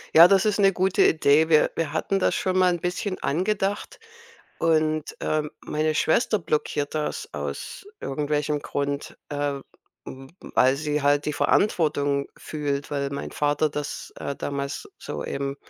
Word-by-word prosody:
Ja, 165 Hz, +2 st, +11 dB
das 195 Hz, +1 st, +4 dB
ist 210 Hz, -1 st, +1 dB
'ne 195 Hz, -1 st, +5 dB
gute 190 Hz, +1 st, +2 dB
Idee. 155 Hz, +1 st, +4 dB
Wir 155 Hz, -1 st, +4 dB
wir 160 Hz, -3 st, -2 dB
hatten 195 Hz, +5 st, 0 dB
das -, -, +2 dB
schon 185 Hz, 0 st, 0 dB
mal 185 Hz, -1 st, +5 dB
'n 175 Hz, -, -3 dB
bisschen 180 Hz, +3 st, -3 dB
angedacht 200 Hz, -, -1 dB, 0.6 s
und, 155 Hz, -2 st, +1 dB
äh, 155 Hz, 0 st, 0 dB, 0.2 s
meine 155 Hz, +1 st, -1 dB
Schwester 215 Hz, +8 st, +2 dB
blockiert 150 Hz, -2 st, -1 dB
das 150 Hz, -, -3 dB
aus 395 Hz, -, -6 dB
irgendwelchem 150 Hz, +1 st, -1 dB
Grund, 140 Hz, 0 st, -3 dB
äh, 145 Hz, -1 st, -2 dB, 0.4 s
m 135 Hz, 0 st, -10 dB, 0.2 s
weil 130 Hz, +1 st, +5 dB
sie 150 Hz, 0 st, -1 dB
halt 145 Hz, +1 st, +2 dB
die 150 Hz, -, 0 dB
Verantwortung 145 Hz, -6 st, +1 dB
fühlt, 145 Hz, -2 st, -3 dB
weil 140 Hz, -1 st, -2 dB
mein 140 Hz, -, -5 dB
Vater 145 Hz, +1 st, +1 dB
das, 150 Hz, 0 st, -5 dB
äh, 140 Hz, -, -4 dB
damals 140 Hz, 0 st, -4 dB
so -, -, -6 dB
eben 140 Hz, 0 st, -3 dB
150 Hz, 155 wpm, -25 LUFS, 145-175 Hz, 0.6 s, Ja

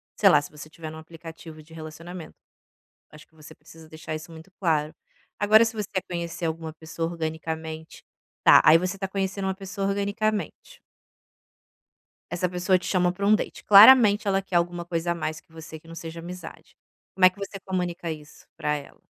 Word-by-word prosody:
sei -, -, +5 dB
lá -, -, +5 dB
se 145 Hz, -, -10 dB
você 150 Hz, +1 st, -11 dB
tiver 160 Hz, -1 st, -9 dB
em 160 Hz, -, -10 dB
um -, -, -9 dB
aplicativo 160 Hz, -1 st, -12 dB
de 160 Hz, +2 st, -18 dB
relacionamento, 165 Hz, +2 st, -9 dB, 0.8 s
acho 150 Hz, 0 st, -15 dB
que -, -, -34 dB
você 155 Hz, -1 st, -14 dB
precisa 160 Hz, -1 st, -16 dB
deixar 155 Hz, 0 st, -7 dB
isso 155 Hz, +3 st, -8 dB
muito 160 Hz, +3 st, -13 dB
claro. 155 Hz, -4 st, 0 dB, 0.4 s
Agora 215 Hz, +2 st, +6 dB
se 225 Hz, -, -3 dB
você 210 Hz, -2 st, -4 dB
quer 190 Hz, -, -1 dB
conhecer 170 Hz, -1 st, -5 dB
alguma 160 Hz, 0 st, -3 dB
pessoa 165 Hz, +1 st, -5 dB
organicamente, 160 Hz, -1 st, -6 dB, 0.4 s
tá, -, -, +8 dB
aí 155 Hz, +1 st, +8 dB
você 185 Hz, +2 st, -3 dB
está 195 Hz, 0 st, -4 dB
conhecendo 195 Hz, 0 st, -3 dB
uma 190 Hz, -, -1 dB
pessoa 195 Hz, 0 st, -4 dB
organicamente. 215 Hz, -, -2 dB, 1.5 s
Essa 180 Hz, +1 st, 0 dB
pessoa 180 Hz, +1 st, +1 dB
te 180 Hz, -, -9 dB
chama 180 Hz, -2 st, +2 dB
pra 200 Hz, +2 st, -3 dB
um 215 Hz, -, +6 dB
date, -, -, -4 dB
claramente 210 Hz, 0 st, +8 dB
ela 195 Hz, 0 st, +2 dB
quer 195 Hz, -2 st, -9 dB
alguma 175 Hz, 0 st, 0 dB
coisa 170 Hz, 0 st, -2 dB
a -, -, +1 dB
mais 155 Hz, -1 st, -4 dB
que -, -, -40 dB
você 160 Hz, -1 st, -10 dB
que 165 Hz, -, -20 dB
não 165 Hz, -, -10 dB
seja 165 Hz, 0 st, -7 dB
amizade. 180 Hz, +2 st, -10 dB, 0.4 s
Como 190 Hz, -, +2 dB
é -, -, +7 dB
que 185 Hz, -, -23 dB
você 200 Hz, 0 st, -6 dB
comunica 180 Hz, -3 st, -4 dB
isso 150 Hz, -1 st, -13 dB
pra 150 Hz, -, -1 dB
ela? 140 Hz, -, -12 dB
170 Hz, 195 wpm, -25 LUFS, 160-195 Hz, 1.5 s, tá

